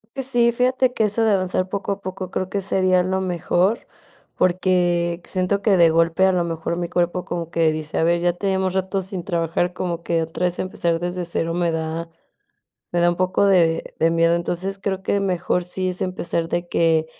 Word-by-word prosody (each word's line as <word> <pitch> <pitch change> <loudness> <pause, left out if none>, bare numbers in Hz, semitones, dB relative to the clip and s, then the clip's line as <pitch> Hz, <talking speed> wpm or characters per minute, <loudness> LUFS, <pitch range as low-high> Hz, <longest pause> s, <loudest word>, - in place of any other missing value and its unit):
Pues, 270 -2 -2
sí, 240 -2 +3
fíjate 255 +1 +2
que 220 - 0
eso 215 +2 +1
de 220 - +3
avanzar 185 -1 0
poco 200 +1 -3
a 200 - -3
poco 185 -1 -6
creo 185 0 -2
que 200 0 -2
sería 185 -1 +2
lo 190 +1 -1
mejor, 185 +3 0 0.5
porque 175 -1 +1
siento 185 +2 -1
que 200 -2 +3
de 170 -2 +6
golpe, 165 +2 +2
a 190 - +4
lo 180 -2 +1
mejor, 165 0 -3
mi 175 -1 -2
cuerpo 175 +1 -1
como 170 -1 -4
que 165 -2 +3
dice: 155 -1 -5
"A - - +2
ver, 170 0 +2
ya 175 0 +3
tenemos 190 +1 -1
ratos 190 0 -1
sin 190 -3 -6
trabajar", 170 0 -1
como 170 -2 -3
que 170 -1 0
otra 165 +2 -3
vez 180 0 -1
empezar 170 -2 -1
desde 180 0 -3
cero 165 0 -2
me 175 -1 0
da 160 +1 -3 0.8
me 175 - +1
da 175 0 +4
un 175 - -3
poco 185 +2 +2
de 170 -4 +2
de 165 +1 +3
miedo. 165 0 +3
Entonces, 180 +3 -3
creo 195 -1 -3
que 200 - 0
mejor 180 -2 0
sí 185 +1 -2
es 180 0 -4
empezar 170 -2 -2
de 175 0 -2
que, 160 -2 +2
180 Hz, 210 wpm, -22 LUFS, 170-190 Hz, 0.8 s, de